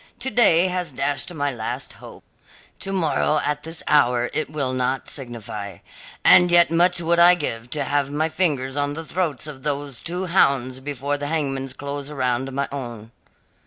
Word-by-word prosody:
To 265 Hz, -, -2 dB
day 195 Hz, -7 st, +5 dB
has 180 Hz, -3 st, -2 dB
dashed 145 Hz, +5 st, -1 dB
my 145 Hz, -4 st, -1 dB
last 110 Hz, -2 st, -5 dB
hope; -, -, -13 dB, 0.6 s
to 195 Hz, -, -3 dB
morrow 160 Hz, -4 st, +1 dB
at 150 Hz, 0 st, -1 dB
this 160 Hz, +1 st, -3 dB
hour 125 Hz, -4 st, +3 dB
it 155 Hz, -, -1 dB
will 140 Hz, -4 st, -2 dB
not 130 Hz, +1 st, -1 dB
signify. 110 Hz, -, -5 dB, 0.5 s
And 180 Hz, 0 st, +8 dB
yet 175 Hz, -2 st, +5 dB
much 175 Hz, +1 st, +3 dB
would 170 Hz, 0 st, +1 dB
I 175 Hz, +1 st, +8 dB
give 120 Hz, -8 st, -4 dB
to 145 Hz, +1 st, -1 dB
have 140 Hz, 0 st, 0 dB
my 150 Hz, +2 st, 0 dB
fingers 145 Hz, -6 st, 0 dB
on 145 Hz, 0 st, -1 dB
the 165 Hz, +1 st, -6 dB
throats 160 Hz, -7 st, -2 dB
of 145 Hz, -3 st, -7 dB
those 140 Hz, -3 st, -3 dB
two 180 Hz, +2 st, -4 dB
hounds 135 Hz, -8 st, +2 dB
before 145 Hz, +1 st, -3 dB
the 145 Hz, -, -3 dB
hangman's 135 Hz, -4 st, -2 dB
close 140 Hz, +1 st, -6 dB
around 130 Hz, -2 st, -1 dB
my 140 Hz, +1 st, -2 dB
own." 120 Hz, -5 st, -7 dB
145 Hz, 175 wpm, -22 LUFS, 130-165 Hz, 0.6 s, And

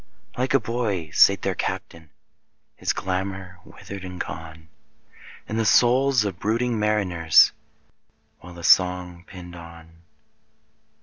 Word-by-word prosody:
Like 130 Hz, +2 st, 0 dB
a -, -, +5 dB
bold 115 Hz, +1 st, -5 dB
boy 100 Hz, -10 st, -2 dB
sate 100 Hz, +3 st, +4 dB
their 95 Hz, -, 0 dB
Captain, 80 Hz, -3 st, -5 dB, 0.7 s
His -, -, -1 dB
glamour 95 Hz, -1 st, -4 dB
withered 100 Hz, -1 st, -10 dB
and 90 Hz, -1 st, -8 dB
gone, 80 Hz, 0 st, -8 dB, 0.8 s
In 110 Hz, -, -4 dB
the 115 Hz, -, +1 dB
souls 125 Hz, +3 st, +3 dB
of 100 Hz, -, -2 dB
his 85 Hz, -, -28 dB
brooding 115 Hz, +2 st, 0 dB
mariners, 95 Hz, -7 st, +3 dB, 0.9 s
While 90 Hz, +1 st, -13 dB
the 85 Hz, -, -11 dB
song 90 Hz, 0 st, +2 dB
pined 90 Hz, -2 st, -11 dB
on. 85 Hz, -1 st, -13 dB
95 Hz, 130 wpm, -23 LUFS, 85-110 Hz, 0.9 s, a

